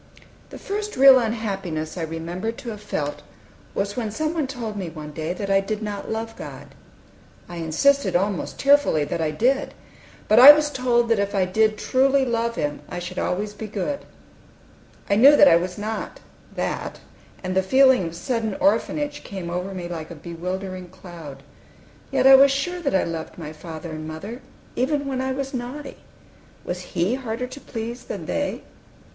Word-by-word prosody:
The - - -9
first 420 +1 -4
real 265 -1 +9
unhappiness 195 -9 -3
I 180 - -4
remember 165 +6 -4
to 235 +1 -8
have 210 -2 -7
felt 145 -8 -3 0.5
was 200 +1 -2
when 230 -4 -2
some 310 +9 -2
one 310 -5 -1
told 235 -5 -5
me, 190 -4 -4
one 155 -2 -8
day, 160 +2 -4
that 195 +2 -3
I 195 - +5
did 215 +2 -3
not 205 -1 -5
love 225 0 -4
God. - - -10 0.7
I 175 - -8
insisted, 185 - +2
almost 195 +1 -1
tearfully, 280 - +4
that 165 - -3
I 160 - +1
did; 255 - 0 0.5
but 215 +2 +6
I 275 +4 +13
was 300 0 0
told 245 -3 +1
that 230 -3 +3
if 200 0 -1
I 190 -2 +3
did 215 +3 +2
truly 265 +4 +2
love 235 -1 -1
Him 145 -5 -2
I 180 - -5
should 175 +1 -5
always 205 +3 -2
be 220 - -7
good. 215 +8 -3 1.1
I 200 - +2
knew 275 +6 +8
I 290 -11 +7
was 180 +1 -1
not 215 +1 -5 0.4
that, - - -3 0.4
and 185 0 -3
the 190 - +4
feeling 260 -1 +4
of 165 - -8
sudden 220 +3 -2
orphanage 290 +9 0
came 185 -4 -6
over 180 +2 -3
me 180 -2 -5
like 165 -3 -6
a 170 - -8
bewildering 180 +3 -5
cloud. 170 -7 -11 0.7
Yet - - +1
I 270 - +9
was 275 +1 +8
sure 280 +7 -1
that 285 - -1
I 190 - +3
loved 165 -1 -5
my 155 -3 -7
father 160 +1 -8
and 155 0 -6
mother, 200 +11 -7 0.3
even 285 +3 0
when 265 -2 -2
I 265 0 -1
was 270 +1 -4
naughty, 260 +3 -6 0.7
Was 180 0 -4 0.2
He 175 +7 +2
harder 250 -2 -3
to 255 +3 -10
please 230 +1 -6
than - - -6
they? - - -2
210 Hz, 180 wpm, -23 LUFS, 175-260 Hz, 1.1 s, I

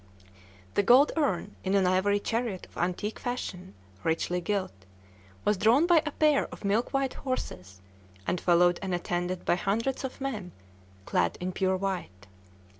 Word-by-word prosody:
The - - +3
gold 250 +8 +6
urn, 210 - 0
in 190 +1 +1
an 195 -2 +4
ivory 190 +3 +2
chariot 225 -3 -2
of - - -23
antique 185 +5 -2
fashion, 190 - -5 0.3
richly 175 +2 0
gilt, 190 +1 -1 0.7
was 210 - +3
drawn 240 - +5
by 345 -2 +5
a - - -1
pair 300 -1 +3
of - - -10
milk 210 +4 +1
white 270 -1 0
horses, 95 - -5 0.4
and 180 - -1
followed 175 0 +4
and 190 -2 -1
attended 175 +1 -2
by - - +3
hundreds 225 +9 -1
of 265 - -5
men 215 -10 -4 0.5
clad 85 -1 +1
in 180 +1 -2
pure 190 0 +1
white. 180 - -4
195 Hz, 155 wpm, -28 LUFS, 180-245 Hz, 0.7 s, gold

